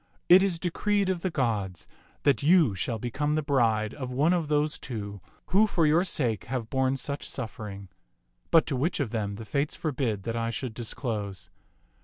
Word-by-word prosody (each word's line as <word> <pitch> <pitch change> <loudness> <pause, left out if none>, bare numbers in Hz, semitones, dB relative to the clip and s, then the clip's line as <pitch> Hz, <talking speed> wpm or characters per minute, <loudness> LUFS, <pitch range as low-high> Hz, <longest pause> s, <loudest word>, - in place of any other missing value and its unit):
It 180 +2 +9
is 190 -3 +1
decreed 195 +3 0
of 180 -2 -1
the 185 - 0
gods 105 - -2 0.4
that 140 -1 +3
you 155 - +5
shall 110 +5 -2
become 145 +7 -1
the 155 - 0
bride 115 -6 +2
of 130 -2 -6
one 145 +7 +3
of 170 -4 0
those 150 0 0
two 100 -5 -6 0.3
who 205 +4 +5
for 170 -5 +2
your 160 +4 +4
sake 125 - -1
have 120 -3 -4
borne 130 0 +2
such 140 +1 -4
suffering; 105 -3 -6 0.6
but 165 - +5
to 140 - -2
which 155 +8 0
of 135 -7 -1
them 105 -3 -2
the 110 +2 -8
Fates 140 +5 -1
forbid 130 - -2
that 115 +1 -3
I 115 0 -1
should 120 0 -4
disclose. 105 - -4
130 Hz, 185 wpm, -28 LUFS, 110-155 Hz, 0.6 s, It